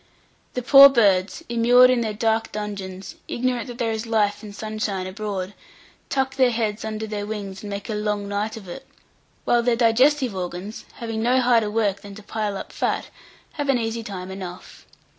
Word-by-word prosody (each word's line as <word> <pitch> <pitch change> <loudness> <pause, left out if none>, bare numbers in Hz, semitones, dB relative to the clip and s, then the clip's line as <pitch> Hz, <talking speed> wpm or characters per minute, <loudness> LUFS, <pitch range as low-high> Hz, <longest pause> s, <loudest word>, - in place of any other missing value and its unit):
The 250 - -2
poor 275 +2 +10
birds, 200 -7 +2
immured 245 +2 +5
in 250 -2 +2
their 220 -2 -1
dark 225 0 0
dungeons, 200 -3 -6
ignorant 250 0 -1
that 240 -1 -8
there 235 -2 -1
is 220 +1 -4
life 210 -2 +1
and 210 -2 -10
sunshine 215 -3 -3
abroad, 190 0 -4 0.6
tuck 265 -1 -1
their 260 -2 +5
heads 225 -2 -2
under 220 0 -4
their 210 -1 -4
wings 200 -3 -6
and 210 - -7
make 200 -1 -5
a 220 - -3
long 210 -1 -2
night 210 +2 -2
of 200 -4 -11
it; 175 - -9 0.6
while 240 - +3
their 235 0 +2
digestive 250 +1 +3
organs, 180 +3 -6
having 225 -1 -4
no 250 +3 +3
harder 235 -4 +3
work 210 -2 0
than 200 -1 -10
to 215 - -12
pile 210 -2 -3
up - - -8
fat, - - -1 0.4
have 290 -2 -4
an 270 - +4
easy 230 0 -2
time 190 -4 -7
enough. 185 -1 -9
215 Hz, 185 wpm, -23 LUFS, 200-235 Hz, 0.6 s, poor